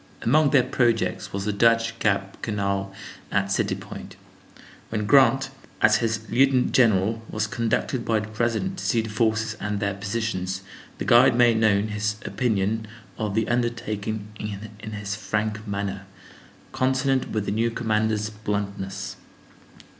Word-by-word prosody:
Among 150 +4 +4
their 135 -3 +5
projects 120 -3 0
was 100 0 -3
the 105 - 0
Dutch 115 +2 +2
Gap 100 -2 0
Canal 100 -2 -1 0.4
at 100 -1 +1
City - - +1
Point. - - -9 0.7
When 105 -1 -2
Grant, 135 +2 +5 0.3
as 105 0 +5
his 110 -1 -2
lieutenant 130 +1 +3
general, 110 -2 +3
was 110 0 -1
conducted 115 +4 -1
by 110 -2 +1
the 110 - -6
President 120 - -1
to - - -6
see 115 - +2
the 110 -1 -6
forces 110 0 +1
and 105 -1 -2
their 100 -1 0
positions, 100 -2 -3 0.3
the - - -4
guide 120 +1 +6
made 120 -2 +5
known 110 -1 +3
his 105 0 -1
opinion 110 -2 0 0.3
of 105 -3 -2
the 110 -1 +1
undertaking 110 -3 -2 0.5
in 110 +1 -7
his 105 -1 -4
frank 110 +1 -2
manner, 100 -1 -3 0.6
consonant 130 0 +1
with 110 -2 -2
the - - -1
new 115 +3 +1
commander's 110 -1 0
bluntness. 100 -2 -4
110 Hz, 145 wpm, -24 LUFS, 100-115 Hz, 0.7 s, guide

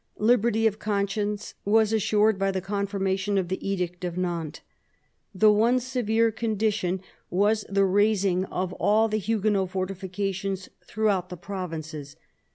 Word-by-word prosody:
Liberty 225 0 +3
of 215 -1 +1
conscience 205 0 -2
was 220 +1 +3
assured 215 -1 +2
by 195 0 +1
the 190 -1 -1
confirmation 195 0 -1
of 185 -3 -1
the 190 +1 -3
Edict 180 -2 -3
of 175 -1 -3
Nantes. 170 -4 -3 0.7
The 215 +3 +6
one 230 +4 +3
severe 230 -3 +1
condition 210 -4 -1 0.3
was 205 +3 +2
the 195 0 +3
razing 195 -2 +2
of 185 -1 -3
all 215 +3 +3
the 215 0 -1
Huguenot 210 -2 0
fortifications 190 0 -3
throughout 205 -4 0
the 180 - -7
provinces. 155 -6 -6
200 Hz, 135 wpm, -26 LUFS, 185-215 Hz, 0.7 s, The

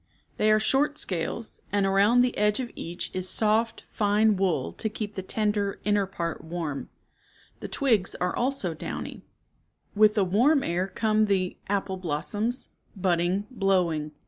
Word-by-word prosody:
They 215 - +3
are 215 - +5
short 285 +6 +2
scales, 190 - -4
and 205 -1 +2
around 200 +5 +4
the 250 -1 +1
edge 210 +2 +2
of 245 -2 -4
each 175 +2 -5
is 185 0 -1
soft, 220 +1 +1
fine 210 +1 +2
wool 185 - 0
to 220 - -2
keep 210 -1 -5
the 190 - -4
tender, 205 0 -1
inner 205 -2 +2
part 170 -3 -4
warm. 160 -4 -4 0.7
The - - -6
twigs 225 - +1
also 220 +2 -1
are - - -5
downy. 155 - -6 0.7
With 210 0 +5
the 200 -3 +3
warm 260 - +3
air 180 +2 0
come 215 +2 +1
the 185 -2 0
Apple 195 -1 -1
blossoms, 205 - -2 0.3
budding, 180 +1 +1
blowing. 180 -8 +1
205 Hz, 150 wpm, -27 LUFS, 180-220 Hz, 0.7 s, are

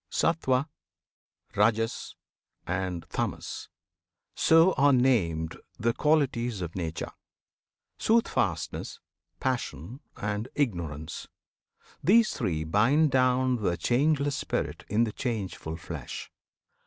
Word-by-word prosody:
Sattwan, 135 -5 +1 0.9
Rajas, 115 +2 +1 0.5
and 90 -1 -2
Tamas, - - -3 0.6
so 165 +3 +5
are 145 +1 +4
named 95 - +2 0.2
The 115 +1 +1
qualities 130 -8 +1
of 85 -1 -5
Nature, 80 -3 -4 0.9
"Soothfastness," 230 +1 0 0.4
"Passion," 125 - -3 0.2
and 105 +2 -2
"Ignorance." 85 - -2 0.8
These 220 +4 +5
three 85 -9 -1
bind 130 - +3
down 130 0 +3
The 90 -6 0
changeless 140 +2 +2
Spirit - - -3
in 110 +3 +3
the 115 - -1
changeful 100 -9 -3
flesh. 80 -6 -7
115 Hz, 95 wpm, -28 LUFS, 90-135 Hz, 0.9 s, so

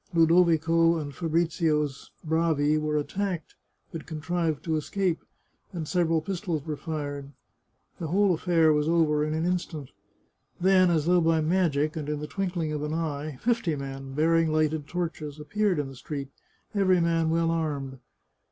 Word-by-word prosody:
Ludovico 165 0 +4
and 145 -3 -5
Fabrizio's 160 -3 0
bravi 160 -2 +2
were 155 0 0
attacked, 180 +2 -3 0.4
but 165 - -7
contrived 160 -1 -2
to 160 -2 -1
escape, 175 +3 -1 0.5
and 165 -4 -4
several 165 -2 +1
pistols 170 -3 -3
were 155 -2 -3
fired. 145 -3 -5 0.7
The 165 - -3
whole 195 +3 +3
affair 165 -2 +3
was 150 +1 +1
over 155 -3 +3
in 155 +1 -1
an 160 +1 -1
instant. 175 -6 -3 0.7
Then, 185 0 +5
as 160 -3 +1
though 175 +1 +4
by 165 0 +3
magic, 155 -3 +1
and 150 -2 -4
in 150 -1 -2
the 150 - -4
twinkling 175 -3 -2
of 150 -1 -3
an 150 +1 -2
eye, 150 -3 -3
fifty 230 -9 +1
men, 135 -1 -6
bearing 165 +1 +3
lighted 155 -1 0
torches, 160 -4 -4
appeared 195 +5 0
in 145 -2 -1
the 135 - -10
street, 140 +1 -6 0.4
every 190 -3 +3
man 165 -1 +1
well 165 0 +2
armed. 145 -5 -3
160 Hz, 155 wpm, -27 LUFS, 150-170 Hz, 0.7 s, Then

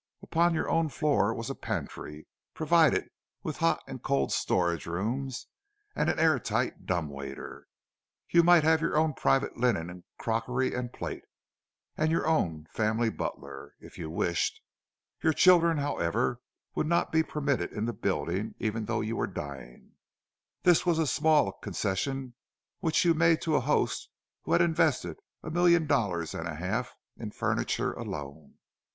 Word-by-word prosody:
Upon 170 +1 +2
your - - -1
own 165 -1 +1
floor 145 -8 +1
was 115 +3 -4
a - - -2
pantry, 75 - -5 0.3
provided - - +3 0.4
with - - -4
hot 85 0 +1
and - - -8
cold 70 -1 0
storage 85 -3 0
rooms 120 +9 -3 0.5
and - - +1
an - - 0
air 155 -4 +4
tight - - -2
dumb 90 -4 0
waiter; 70 -1 -8 0.6
you 170 - +5
might 175 -1 +6
have 160 +1 +4
your 165 -2 0
own 155 0 +2
private 135 +1 +1
linen 110 -9 +1
and 90 0 -11
crockery 125 +3 -1
and 125 -1 -3
plate, - - -5 0.7
and 155 0 +1
your 165 - +1
own 85 - 0
family 110 +1 +1
butler, - - -6
if - - -14
you 80 - -5
wished. 85 +1 -1 0.6
Your 160 - +3
children, 170 -1 +5
however, 120 - -1 0.3
would - - -1
not 170 +1 +1
be 160 - +4
permitted 150 -3 -1
in 105 0 -3
the 120 - -2
building, 95 +1 -2
even 110 0 -2
though 115 0 -1
you 110 +1 -2
were - - -1
dying—this 70 - -3
was 175 -2 +2
a 160 - +2
small 150 -7 +3
concession 125 +8 -3 0.5
which 165 -1 +1
you 170 - +5
made 165 0 +4
to 160 -2 +1
a - - +3
host 145 +4 0 0.4
who - - 0
had - - +5
invested 155 - +1 0.2
a 155 - -5
million 170 -1 +4
dollars 100 - 0
and 85 - -4
a 80 - -5
half 95 +10 -3 0.2
in - - -5
furniture - - -1
alone. 70 0 -7
125 Hz, 160 wpm, -29 LUFS, -, 0.7 s, might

